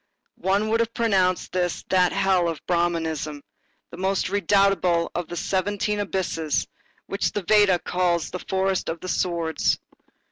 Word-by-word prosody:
One 200 +3 +1
would 225 +1 +2
have 230 0 -1
pronounced 190 -6 +1
this 180 -2 -1
that 180 -1 +3
hell 190 -3 +2
of 165 - -4
Brahmanism, 160 -4 -1 0.5
the - - -9
most 190 0 0
redoubtable 195 -3 +2
of 175 -2 -3
the 175 - -6
seventeen 205 +3 -1
abysses, 165 -6 -1 0.4
which 195 - -2
the 205 - -2
Veda 205 -2 +5
calls 175 0 0
the 180 - -4
Forest 190 0 -1
of 165 - -2
Swords. 170 -3 0
185 Hz, 140 wpm, -24 LUFS, 170-195 Hz, 0.5 s, Veda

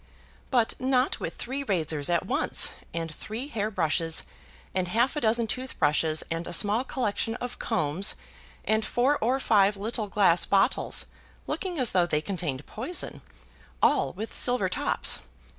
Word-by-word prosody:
"But 240 -4 +2
not 255 0 +1
with - - -4
three 265 +3 -4
razors 160 - 0
at 170 -1 +1
once; - - +3 0.2
and 165 -1 -4
three 230 - -6
hair 215 -5 -2
brushes, 165 -4 0 0.5
and 185 -1 0
half 235 - +1
a 295 - -2
dozen 230 +1 +2
toothbrushes, 160 - 0
and 165 +1 -3
a - - -5
small 210 +7 +2
collection 225 -3 -2
of 245 0 -6
combs, 160 +5 0 0.5
and 220 0 +2
four 260 +7 +1
or 250 +5 +2
five 205 -5 +3
little 215 +1 -2
glass 185 -4 +4
bottles, 200 +7 +2 0.4
looking 365 -4 -3
as 255 -5 +4
though 180 -2 +3
they 150 -3 +1
contained 155 -6 -4
poison, 270 +11 -5 0.6
all - - +3
with 215 +5 -6
silver 245 -7 +2
tops. - - +1
210 Hz, 150 wpm, -27 LUFS, 170-245 Hz, 0.6 s, glass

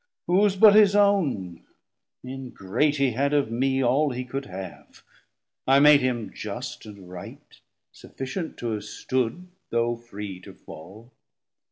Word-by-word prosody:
Whose 195 +2 +3
but 205 +1 +7
his 205 -1 +6
own? 150 - +1 0.6
ingrate, 130 +1 -2
he 135 -3 +1
had 140 +5 0
of 140 -6 +1
mee 130 +3 0
All 140 +5 +2
he 125 -1 -5
could 135 +2 -5
have; 95 -1 -10 0.6
I 135 +1 +5
made 150 0 +7
him 125 -4 -2
just 120 +2 -7
and 100 -3 -12
right, 90 -1 -12 0.3
Sufficient 160 +6 -7
to 120 -1 -3
have 105 -1 -4
stood, 130 +8 -3 0.2
though 120 0 0
free 105 -5 -8
to 90 - -13
fall. 105 +10 -13
125 Hz, 140 wpm, -25 LUFS, 110-145 Hz, 0.6 s, but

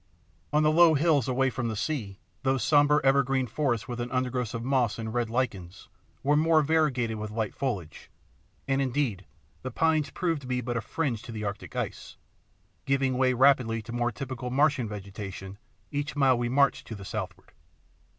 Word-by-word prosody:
On 150 +1 +3
the 155 - +4
low 165 0 +6
hills 145 -4 +3
away 135 +1 +1
from 120 -1 -3
the 110 - -2
sea 105 -4 -3 0.2
those 130 -1 +1
sombre 145 0 +4
evergreen 135 -1 +3
forests 125 -1 -1
with 120 -1 -5
an 120 0 -3
undergrowth 125 -2 -1
of 115 - -4
moss 125 -4 +1
and 110 -1 -5
red 120 -2 0
lichens 100 -7 -3 0.3
were 145 +2 +3
more 160 0 +4
variegated 140 -7 +1
with 105 0 -4
light 110 -1 -2
foliage, 100 - -4 0.6
and 135 0 +1
indeed 125 -8 -1 0.3
the 130 - -4
pines 155 +3 +1
proved 165 -5 -1
to 130 - -10
be 125 0 -1
but 120 0 -3
a 115 - 0
fringe 120 -1 -2
to - - -9
the 110 -1 -5
Arctic 100 -2 -5
ice, - - -5 0.7
giving 135 -1 +1
way 130 0 +3
rapidly 125 -3 +4
to 115 - -9
more 120 0 0
typical 125 +1 -5
Martian 140 -2 +2
vegetation 100 -1 -7 0.3
each 145 +1 -3
mile 135 -3 +4
we 120 0 -1
marched 140 +1 +2
to 115 - -6
the 100 -1 -9
southward. 95 -2 -6
125 Hz, 180 wpm, -28 LUFS, 115-140 Hz, 0.7 s, low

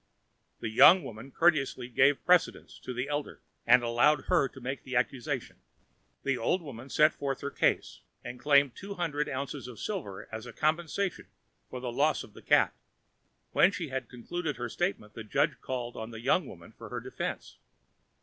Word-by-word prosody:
The - - -2
young 175 +11 +7
woman 110 +4 -9
courteously 140 -7 +2
gave 135 +3 +3
precedence 180 -1 +2
to - - -7
the 125 +2 -3
elder, 145 0 -3 0.3
and 125 -1 +6
allowed 120 +6 +3
her 170 -7 +2
to 130 - -13
make 130 +2 -4
the 130 -1 -6
accusation. 130 +1 -2 0.7
The 135 -2 0
old 175 +10 0
woman 130 -3 -9
set 155 +2 +4
forth 135 -2 -3
her 140 - -4
case, - - 0 0.2
and 125 - -7
claimed 140 -2 +4
two 200 +1 -7
hundred 150 -5 -1
ounces 140 0 -4
of 125 -3 -10
silver 150 - -5
as 110 +2 -6
a 120 - -9
compensation 170 +4 -1 0.4
for 125 - -6
the 125 -1 -4
loss 145 +5 +1
of 105 - -15
the - - -13
cat. - - +4 0.8
When 185 - +5
she 180 -7 -5
had 130 -3 -4
concluded 150 +5 -4
her 120 0 -4
statement, 115 - -2
the 115 - -7
judge 105 - 0
called 120 -2 -4
on 110 0 -6
the 115 -1 -8
young 135 +6 +2
woman 85 -6 -12
for - - -11
her - - -4
defense. - - -6
135 Hz, 180 wpm, -30 LUFS, 120-155 Hz, 0.8 s, young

